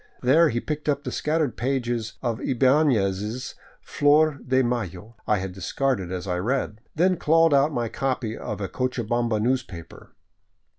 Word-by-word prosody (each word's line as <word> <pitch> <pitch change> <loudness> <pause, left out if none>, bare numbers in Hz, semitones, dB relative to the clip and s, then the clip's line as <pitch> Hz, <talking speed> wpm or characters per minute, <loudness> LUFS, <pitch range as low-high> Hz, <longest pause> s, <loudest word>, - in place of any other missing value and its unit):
There 155 +6 +5
he 120 - -1
picked 150 +3 -4
up 145 0 0
the - - -4
scattered 150 -4 0
pages 120 -3 -2
of 120 -1 -2
Ibanez' 125 -5 +1 0.2
*' - - -31
Flor 150 0 +3
de 130 +1 +2
Mayo 115 -3 -4
" - - -39
I 105 - +3
had 95 0 -4
discarded 95 +1 -2
as 90 0 -4
I 90 -2 -2
read, 110 0 -2
then 180 +3 +2
clawed 165 0 +4
out 140 +2 +4
my 120 -4 -1
copy 125 -2 -2
of 105 - -5
a 95 - -2
Cochabamba 120 0 -1
newspaper. 105 -8 -4
125 Hz, 160 wpm, -24 LUFS, 105-140 Hz, 0.2 s, There